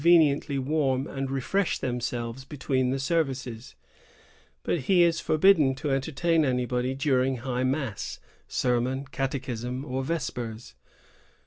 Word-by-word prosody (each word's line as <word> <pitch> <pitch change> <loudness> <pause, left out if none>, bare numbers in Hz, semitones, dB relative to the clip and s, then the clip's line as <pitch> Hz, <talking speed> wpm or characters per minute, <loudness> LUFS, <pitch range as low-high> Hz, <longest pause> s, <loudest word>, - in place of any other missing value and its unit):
185 170 +2 +7
veniently 145 -2 +1
warm 135 -1 +1
and 135 -2 -4
refresh 150 +9 0
themselves 120 0 -3
between 130 -2 -1
the 135 - 0
services; 135 -5 -2 0.9
but 175 - 0
he 175 +6 +4
is 170 -1 +3
forbidden 155 -5 +4
to 140 +2 -3
entertain 155 +4 +1
anybody 125 -1 0
during 135 -1 +2
high 125 +1 -2
mass, 130 - -2 0.3
sermon, 125 +2 0
catechism, 130 -1 -3
or 130 -1 -2
vespers. 125 -7 -4
135 Hz, 120 wpm, -27 LUFS, 125-150 Hz, 0.9 s, 185